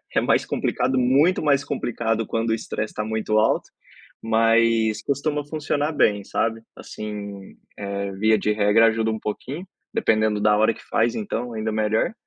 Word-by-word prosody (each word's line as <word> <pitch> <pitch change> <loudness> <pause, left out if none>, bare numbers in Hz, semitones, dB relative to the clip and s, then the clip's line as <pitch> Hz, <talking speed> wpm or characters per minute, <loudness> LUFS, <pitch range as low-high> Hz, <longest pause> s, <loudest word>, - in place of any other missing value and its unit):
é - - +4
mais - - +2
complicado, 130 +1 0
muito 140 +9 +3
mais 145 -2 +2
complicado 115 -4 -2
quando 115 0 -1
o - - +3
estresse 110 -1 -4
está 105 - -3
muito 110 0 0
alto, 110 - +2 0.5
mas 115 0 +2
costuma 145 +1 -1
funcionar 150 0 -2
bem, 105 -8 +2
sabe, 115 +1 -1
assim, 100 -2 -8 0.2
eh, 100 -1 -4
via 110 +3 +2
de 105 +2 0
regra, 105 +2 +4
ajuda 110 0 +1
um 110 - -2
pouquinho, 140 - -5 0.3
dependendo 110 - +1
da 105 0 +4
hora 110 +2 +3
que - - -15
faz 115 +1 +1
então, 115 +3 -4
ainda 110 -1 -3
melhor, 110 - 0
110 Hz, 160 wpm, -23 LUFS, 105-125 Hz, 0.5 s, é